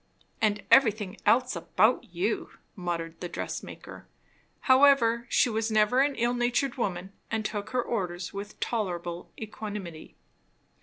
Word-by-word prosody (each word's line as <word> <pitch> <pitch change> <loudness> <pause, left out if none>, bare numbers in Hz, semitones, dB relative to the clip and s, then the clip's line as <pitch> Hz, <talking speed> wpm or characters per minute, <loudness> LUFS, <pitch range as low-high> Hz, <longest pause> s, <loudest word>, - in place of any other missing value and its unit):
"And 205 -2 +1
everything 215 -6 +4
else 250 -2 +3
about 210 +7 +2
you! 180 +5 -2
" - - -41
muttered 170 -3 -4
the 175 - -4
dress - - -4
maker. - - -11 0.5
However, 260 -3 +4
she - - +4
was 225 -1 -1
never 215 +3 +3
an 280 0 +2
ill 240 +1 +1
natured 245 +2 0
woman, 190 -5 -3 0.2
and 220 -1 -2
took 205 -2 -3
her 250 -1 0
orders 180 -6 -3
with 200 +1 -7
tolerable 175 -6 -3
equanimity. 205 -6 -7
215 Hz, 140 wpm, -28 LUFS, 180-240 Hz, 0.5 s, everything